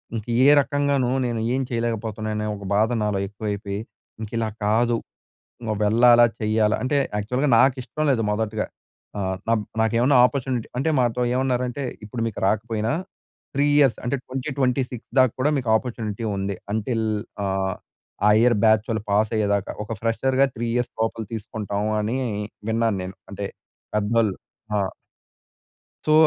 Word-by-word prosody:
ఇంక 110 -2 -4 0.2
ఏ - - +7
రకంగాను 140 -2 +1 0.2
నేను 120 -2 -1
ఏం 135 - +1
చేయలేకపోతున్నాను. 110 -2 -2
అనే 105 - -2
ఒక 100 -1 -9
బాధ 110 +2 +3
నాలో 105 -2 0
ఎక్కువైపోయి, 100 -1 -4 0.4
ఇంక 110 - -5
ఇలా 110 -1 0 0.2
కాదు 115 +3 +2 0.7
ఇంక 110 -2 -2
వెళ్ళాలా, 120 +3 +6 0.2
చేయాలా 110 0 +2
అంటే, 145 +3 +1 0.2
యాక్చువల్‌గా 125 +8 0
నాకు 130 +1 +5
ఇష్టం 155 +4 -3
లేదు 115 -3 +1
మొదటగా. 110 0 -1 0.5
ఆహ్, 95 -1 -1
నబ్ 115 -1 +3 0.2
నాకేమన్నా 120 +5 +3
అపార్చునిటీ 125 -2 -3
అంటే 140 +5 +1
మాతో 120 0 +1
ఏమన్నారంటే, 125 0 0 0.2
ఇప్పుడు 115 +2 -4
మీకు 110 - -8
రాకపోయినా 110 +2 0 0.6
3 140 +1 +2
ఇయర్స్ 135 -6 +4
అంటే 120 +3 0
2026 130 -2 -2
దాకా 130 -3 +5
కూడా 145 +3 +3
మీకు 125 -3 -4
అపార్చునిటీ 115 -2 -4
ఉంది. 100 0 -2 0.2
అంటిల్ 110 +1 -1 0.4
ఆహ్, 95 -1 0 0.5
ఆ - - +7
ఇయర్ 120 -1 +4
బ్యాచ్ 110 -1 +5
వాళ్ళు 110 -2 -1
పాస్ 105 +1 +3
అయ్యేదాక. 100 -2 +1 0.2
ఒక 110 - -6
ఫ్రెషర్‌గా 130 +4 +2
3 120 +1 -2
ఇయర్స్ 120 0 -1
లోపల 115 0 -1
తీసుకుంటాం 105 -1 -3
అని 110 +5 -1 0.5
విన్నాను 115 -2 +1
నేను. 95 +1 -8
అంటే - - -4 0.5
పెద్దోళ్ళు 105 -1 +2 0.4
ఆ! - - +2 1.3
సో, 155 - +3
115 Hz, 145 wpm, -23 LUFS, 105-125 Hz, 1.3 s, ఏ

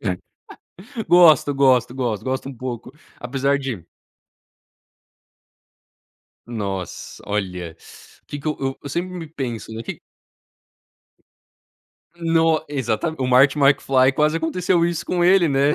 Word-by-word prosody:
É, 100 - -1
ah, 90 - -7 0.9
gosto, 160 -5 +6
gosto, 130 -3 +3
gosto, 120 -5 -2
gosto 130 +1 -3
um 135 - -8
pouco, 125 0 -6 0.3
apesar 135 +3 0
de 125 -11 -5 2.6
Nossa, 100 -6 -6
olha. 90 -5 -4 0.5
Que 145 - -6
que 145 - -10
eu 135 -3 -3
eu 140 - -7
sempre 180 +5 -3
me 165 -2 -6
penso, 125 -8 -6
que - - -7 2.2
No 165 -1 +2
exata 140 +2 -2
o 130 - -1
Marty 135 +3 +4
Macfly, 135 -2 +4
quase 150 +2 +2
aconteceu 170 +1 +1
isso 170 -1 -2
com 175 -1 -1
ele, 180 -1 +5
né, 140 +2 +2
135 Hz, 120 wpm, -21 LUFS, 125-160 Hz, 2.6 s, gosto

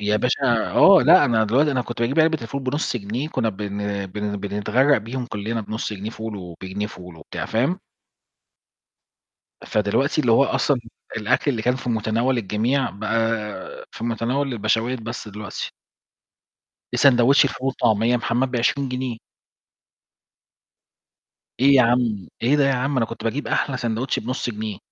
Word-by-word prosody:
يا 105 +1 +1
باشا 125 -1 +1
آه. 195 -1 +7
لأ، 185 - +7
أنا 110 -2 +2
دلوقتي 135 +8 +2
أنا 130 -2 0
كنت 120 0 -7
باجيب 135 +7 +2
علبة 160 -1 +3
الفول 135 +4 -5
بنُص 130 0 -1
جنيه، 120 +8 -4
كُنّا 125 -7 -1
بن 100 -1 -4
بن 105 +1 -4
بنتغرَّق 105 +7 +1
بيهم 120 +3 -5
كُلّنا، 110 +1 -3
بنُص 110 +1 -4
جنيه 105 +2 -5
فول 110 -2 -6
وبجنيه 95 +3 -6
فول 90 -6 -11
وبتاع، 80 - -6
فاهم؟ 135 - 0 1.9
فدلوقتي 110 +9 +1
اللي 120 -5 +2
هو 135 +5 +5
أصلًا 135 -2 +1 0.4
الأكل 120 +6 +1
اللي 115 -5 -2
كان 125 +2 +1
في 125 - -6
مُتناوَل 115 +3 0
الجميع، 120 +6 0
بقى 110 0 -3
في 115 - -7
مُتناوَل 125 +4 -1
البَشاوات 115 +3 0
بس 115 -1 -6
دلوقتي. 105 0 -6 1.2
إ - - +1
ساندويتش 135 +1 +5
الفول 135 -1 -3
والطعمية 115 -3 +1
يا - - +4
محمد 120 +2 0
ب20 130 +3 0
جنيه! 125 -2 -3 2.4
إيه 140 +2 +6
يا 130 - +7
عَم، 115 -4 +1
إيه 135 +5 +3
ده 145 - +3
يا 135 - +3
عَم؟ 135 +2 -1
أنا 115 -3 +2
كنت 115 - -9
باجيب 130 +6 -2
أحلى 135 - 0
ساندويتش 120 +1 -2
بنُص 125 +1 -3
جنيه. 105 -2 -5
115 Hz, 155 wpm, -22 LUFS, 105-130 Hz, 2.4 s, آه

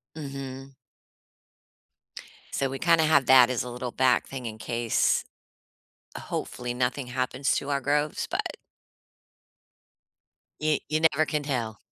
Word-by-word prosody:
Mhm. 135 -2 -7 1.8
So, 135 - 0
we 135 0 -5
kinda 165 +1 +4
have 145 -4 +4
that 130 -1 +7
as 125 -2 -1
a 125 - -6
little 125 0 -5
back 130 0 +2
thing 130 -2 -7
in 110 -1 -5
case. 115 +1 +1 0.9
Hopefully, 125 -7 -4
nothing 125 +1 -1
happens 130 +2 0
to 140 - -3
our 140 -1 +1
groves, 145 +2 0
but - - -2 2.0
you 155 -1 +2
you 155 - 0
never 155 +2 +2
can 150 -1 -2
tell. 120 -7 -3
135 Hz, 125 wpm, -27 LUFS, 125-145 Hz, 2.0 s, that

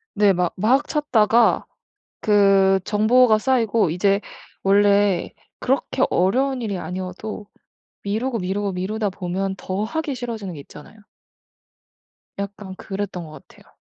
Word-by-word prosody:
네. 205 -1 +4
막 180 -1 -1
막 260 +9 +2
찾다가 235 -6 +2 0.6
그 195 -2 +4
정보가 220 +2 +4
쌓이고 230 - +1
이제 195 +4 +1 0.4
원래 200 -1 +3 0.3
그렇게 265 0 0
어려운 255 +8 +1
일이 205 -4 -3
아니어도 185 +4 -6 0.6
미루고 230 +4 -2
미루고 195 +2 -2
미루다 205 +4 -2
보면 190 +1 -3
더 195 +3 -3
하기 300 +4 -3
싫어지는 230 -6 -5
게 145 - -9
있잖아요. 150 +10 -14 1.4
약간 200 -1 -6
그랬던 195 -4 -5
것 155 -3 -13
같아요. - - -21
205 Hz, 265 characters per minute, -22 LUFS, 190-225 Hz, 1.4 s, 네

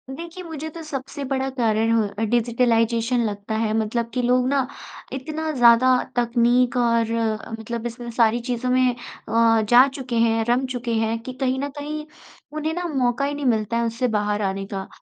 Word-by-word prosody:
देखिए, 340 +3 -8
मुझे 315 -2 -6
तो 330 +1 -9
सबसे 280 -1 -6
बड़ा 265 0 0
कारण 225 -1 +2
हो 225 -1 +3 0.2
अ, 225 - 0
डिजिटलाइज़ेशन 235 0 +2
लगता 205 +1 -4
है। 220 -1 0
मतलब 230 +2 -1
कि 250 - 0
लोग 250 +1 +2
ना 270 -2 +1 0.5
इतना 310 +4 -3
ज़्यादा 245 -1 +5 0.2
तकनीक 245 +1 +2
और 230 -2 +2
अ, 220 -1 -2
मतलब 235 +1 -5
इसमें 240 0 -7
सारी 230 0 +3
चीज़ों 250 +1 -1
में 255 0 +4
अ, 230 -1 +1
जा 245 +3 +7
चुके 265 -3 -5
हैं, 225 -1 +2
रम 245 +2 +1
चुके 245 -2 -3
हैं 225 0 0
कि 255 - -6
कहीं 260 0 +1
न 285 +1 -2
कहीं 300 +1 -5 0.5
उन्हें 310 +1 -2
ना 355 0 -3
मौका 250 +1 +1
ही 285 - -2
नहीं 290 -1 -4
मिलता 225 -1 +1
है 235 - +1
उससे 230 +2 -1
बाहर 210 0 -1
आने 195 0 -2
का। 195 0 -4
240 Hz, 190 wpm, -23 LUFS, 230-265 Hz, 0.5 s, जा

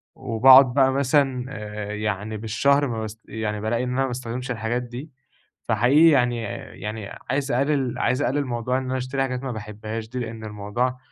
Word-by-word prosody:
وباقعُد 130 +3 +6
بقى 135 0 +4
مثلًا 135 -2 +1
آآ 105 -3 -6
يعني 105 0 -3
بالشهر 140 +7 +2
ما 115 -3 -3
باس 110 0 -6
يعني 105 -1 -3
بالاقي 115 +3 0
إن 125 - -2
أنا 125 +2 0
ما 135 - +1
باستخدمش 125 0 -4
الحاجات 120 +1 -2
دي، 125 +5 -8 0.5
فحقيقي 130 +10 +5
يعني 125 -5 +2 0.4
يعني 105 -1 -5 0.2
عايز 135 +1 0
اقلل 135 0 0
عايز 130 - +1
اقلل 145 +1 0
موضوع 125 0 -1
إن 130 - -2
أنا 130 0 -2
اشتري 130 +2 -2
حاجات 130 -1 -2
ما 130 - -3
باحبهاش 110 0 -6
دي، 125 - -4
لإن 115 -2 -6
الموضوع 110 +5 -2
125 Hz, 180 wpm, -24 LUFS, 110-130 Hz, 0.5 s, وباقعُد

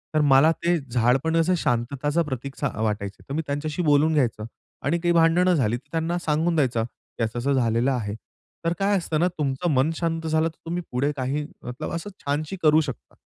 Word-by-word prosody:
तर 155 - +4
मला 145 +2 +6
ते 170 +1 +1
झाड 120 +1 +3
पण 160 0 0
असं 175 +3 +3
शांतताचं 140 +5 0
प्रतीकचा 135 -2 -4
अ, 110 - -5
वाटायचं. 105 -2 -2
तर - - -3
मी 160 - 0
त्यांच्याशी 145 +4 -2
बोलून 150 +1 +4
घ्यायचं 120 -7 0 0.4
आणि 170 +4 +1
काही 175 0 +1
भांडणं 170 +2 +4
झाली, 120 -6 +1
तर 145 - -19
त्यांना 165 +1 -1
सांगून 160 +3 +1
द्यायचा 125 -7 +1
की 115 0 -8
असं-असं 120 +5 -1
झालेलं 120 0 +2
आहे. 105 -5 -2 0.5
तर 165 - +2
काय 200 +1 +2
असतं 165 -3 -1
ना 175 - +3
तुमचं 145 +3 -1
मन 135 +3 +3
शांत 165 -1 -2
झालं, 160 +1 +2
तर 165 - -9
तुम्ही 175 +2 -2
पुढे 135 +4 +1
काही 135 +3 -1 0.2
मतलब 125 +1 -5
असं 170 +5 -4 0.2
छानशी 150 +5 -1
करू 155 0 +5
शकता. 135 -4 -7
145 Hz, 200 wpm, -24 LUFS, 125-165 Hz, 0.5 s, मला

